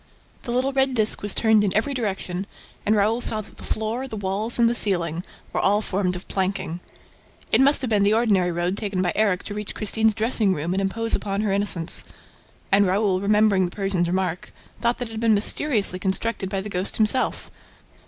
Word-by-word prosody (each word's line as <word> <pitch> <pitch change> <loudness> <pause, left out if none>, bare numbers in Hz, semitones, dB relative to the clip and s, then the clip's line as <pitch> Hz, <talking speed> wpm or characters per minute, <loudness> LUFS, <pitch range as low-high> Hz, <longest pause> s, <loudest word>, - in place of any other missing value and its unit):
The 240 - -6
little 255 +3 0
red 265 -1 +1
disk 215 -2 +1
was 205 -1 -1
turned 220 -2 +3
in 195 -2 -1
every 275 +6 0
direction 195 -5 -3 0.4
and 215 - +4
Raoul 215 +3 +1
saw 215 -2 +2
that 215 - -16
the - - -12
floor, 225 +5 -3
the 220 - -7
walls 205 +4 -2
and 235 -1 +4
the 235 - +1
ceiling 175 -7 -1 0.3
were - - 0
all 205 +2 +2
formed 185 -2 -1
of 180 - -9
planking. 190 -3 -2 0.7
It - - +4
must 280 +1 +6
have 255 -3 -3
been 210 -2 +3
the 205 +2 +3
ordinary 200 -6 +2
road 175 +3 -2
taken 200 -4 -1
by 175 - +1
Erik 200 -4 +1
to 205 - -6
reach 210 0 -5
Christine's 220 0 +2
dressing 220 -3 +1
room 160 +4 -3
and 195 - 0
impose 225 +4 0
upon 200 0 -1
her 210 -2 0
innocence. 195 -4 +2 0.7
And 200 0 +4
Raoul, 190 0 +1
remembering 205 -2 +3
the 175 - -7
Persian's 195 -4 -1
remark, 180 -1 -2 0.3
thought 235 0 +1
that 245 - -4
it - - -12
had 220 - -5
been 225 -1 +3
mysteriously 205 -3 +1
constructed 190 +1 -2
by 195 -1 -2
the 200 - -7
ghost 185 0 -2
himself. 220 +4 0
205 Hz, 205 wpm, -23 LUFS, 190-225 Hz, 0.7 s, must